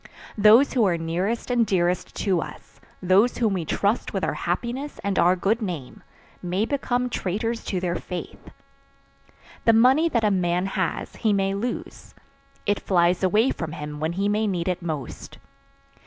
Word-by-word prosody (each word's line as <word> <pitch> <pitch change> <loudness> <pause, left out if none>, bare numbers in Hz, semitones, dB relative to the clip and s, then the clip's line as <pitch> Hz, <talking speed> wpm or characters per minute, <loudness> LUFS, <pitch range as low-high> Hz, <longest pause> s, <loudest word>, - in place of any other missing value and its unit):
Those 220 +7 +6
who 245 - +3
are 175 -2 +1
nearest 180 +10 -2
and 240 -1 +3
dearest 180 -4 0
to 185 -5 0
us, - - -11 0.2
those 195 +7 +3
whom 225 -4 +1
we 175 -4 -2
trust 205 +8 0
with - - -2
our - - 0
happiness 260 +5 -3
and 200 -2 0
our 180 +2 +4
good 205 +6 0
name, 170 - -5 0.4
may 185 +4 -1
become 250 -2 -1
traitors 225 +1 -2
to 185 - -2
their 175 -1 -1
faith. 180 -1 -7 1.2
The 230 - +6
money 260 +9 +5
that 235 -7 0
a 210 - +3
man 180 -1 +1
has 190 -3 -3
he 220 -3 +1
may 195 -1 +1
lose. 235 +5 -5 0.5
It 205 0 +1
flies 175 -1 +2
away 210 +7 +3
from 160 -2 -5
him 150 -1 -6
when 160 +2 -1
he 195 +3 0
may 210 +1 +1
need 180 -3 -2
it 180 -1 -1
most. 155 -7 -6
195 Hz, 170 wpm, -24 LUFS, 175-225 Hz, 1.2 s, Those